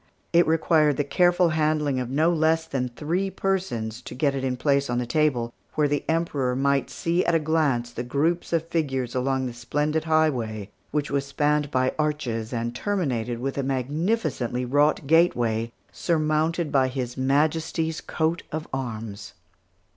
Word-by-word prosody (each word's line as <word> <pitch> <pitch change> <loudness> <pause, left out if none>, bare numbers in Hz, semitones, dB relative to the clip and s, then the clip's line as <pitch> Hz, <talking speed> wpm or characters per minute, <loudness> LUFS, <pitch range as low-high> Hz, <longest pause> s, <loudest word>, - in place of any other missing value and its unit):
It 170 +1 +5
required 155 -2 +3
the 145 - +2
careful 175 +4 +3
handling 150 -3 +1
of 125 -1 -3
no 155 +6 +2
less 160 0 +2
than 135 -5 -2
three 165 +10 -2
persons 125 - -2
to 125 - -9
get 140 +1 +1
it 135 -1 -3
in 130 -1 -1
place 140 0 +1
on 120 - 0
the 125 - 0
table, 120 -4 +1 0.2
where 150 -1 +3
the 145 0 -1
Emperor 145 -6 0
might 140 +1 +1
see 170 +2 0
at 170 - +2
a - - +4
glance 150 -7 +1
the 120 - -5
groups 145 +8 0
of 165 -1 0
figures 135 -7 -1
along 130 +1 0
the 125 - -4
splendid 150 +6 -1
highway, 120 -11 0 0.2
which 150 -1 -2
was 140 -1 0
spanned 150 +1 +1
by 130 -2 +1
arches 125 -8 -1
and 120 -1 -2
terminated 125 - -1
with 135 +3 -3
a - - +2
magnificently 135 - -1
wrought 145 +3 +2
gateway, 120 -8 +2 0.2
surmounted 155 0 0
by 135 -2 +3
His 125 -2 -4
Majesty's 155 +4 0
coat 160 +2 -1
of 155 +1 -4
arms. 115 -6 -5
145 Hz, 160 wpm, -25 LUFS, 125-160 Hz, 0.2 s, It